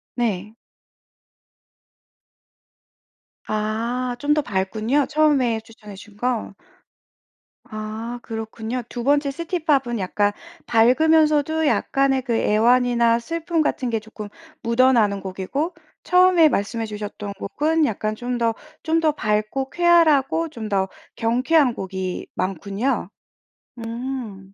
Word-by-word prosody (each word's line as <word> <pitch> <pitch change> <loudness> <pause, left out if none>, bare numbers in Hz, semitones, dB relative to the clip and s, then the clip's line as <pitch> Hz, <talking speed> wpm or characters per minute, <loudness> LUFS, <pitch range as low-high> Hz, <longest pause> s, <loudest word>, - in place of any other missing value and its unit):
네. 215 -3 -2 2.9
아 230 +4 -2
좀 290 +2 +2
더 300 - +2
밝군요. 220 +5 0
처음에 285 -7 +2
추천해 215 -2 -13
주신 205 +1 -14
거. 245 -3 -2 1.2
아 220 +2 -5
그렇군요. 225 +2 -5
2번째 280 +4 +1
시티팝은 290 - -1
약간 205 +2 +1 0.3
밝으면서도 305 +5 +3
약간의 275 -2 +1
그 240 -3 -2
애환이나 235 +1 +3
슬픔 330 +5 -2
같은 260 -4 -1
게 225 -1 0
조끔 215 -1 -9 0.3
묻어나는 230 -4 +3
곡이고 195 - -3 0.3
처음에 360 -3 +5
말씀해 225 0 -2
주셨던 210 -1 -6
곡은 305 +11 0
약간 215 -2 -2
좀 245 +2 -3
더 230 -1 +1 0.3
좀 325 0 +2
더 310 -2 +3
밝고 215 +1 -1
쾌활하고 330 -2 +3
좀 230 -7 -7
더 195 -2 +1 0.3
경쾌한 250 +4 +2
곡이 190 -2 -5
많군요. 195 +5 -2 0.7
음. 230 -4 -6
235 Hz, 220 characters per minute, -22 LUFS, 215-285 Hz, 2.9 s, 처음에